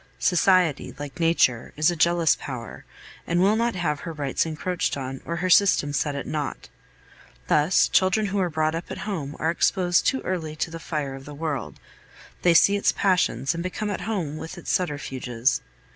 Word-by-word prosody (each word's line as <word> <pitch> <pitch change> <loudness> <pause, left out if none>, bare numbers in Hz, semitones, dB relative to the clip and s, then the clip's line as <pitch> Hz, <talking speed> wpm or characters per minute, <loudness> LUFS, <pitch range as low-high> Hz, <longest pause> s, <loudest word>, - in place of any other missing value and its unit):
Society, 180 -4 +2
like 145 +3 -8
nature, 165 -8 +2
is 155 +3 +3
a - - -3
jealous 170 -1 +3
power, 125 -4 -7 0.4
and 170 +1 +1
will 190 +2 +4
have 235 0 0
not 150 -5 -1
her 165 - -6
rights 145 0 -1
encroached 165 +1 -2
on, 135 -1 -5
or 170 - -3
her 180 +2 -2
system 175 -7 +4
set 145 0 -1
at 140 - -4
naught. 150 -2 -4 0.8
Thus, 150 +5 +3
children 190 +3 +2
who 200 0 -1
are 180 -2 +1
brought 155 -1 0
up 165 +1 -5
at - - -5
home 155 -9 -4
are 160 - 0
exposed 175 0 +2
too 265 - +2
early 160 -4 -3
to 160 - -3
the 165 - -7
fire 150 -4 -3
of 135 0 -10
the 145 - -9
world; 150 -2 -4 0.6
they 175 -1 +4
see 200 +4 +6
its 200 - +2
passions 175 - +1
and 170 - -4
become 205 +4 -3
at 190 - -4
home 175 -7 -3
with 160 +3 -8
its 175 - -4
subterfuges. 130 -7 -1
165 Hz, 190 wpm, -24 LUFS, 145-180 Hz, 0.8 s, see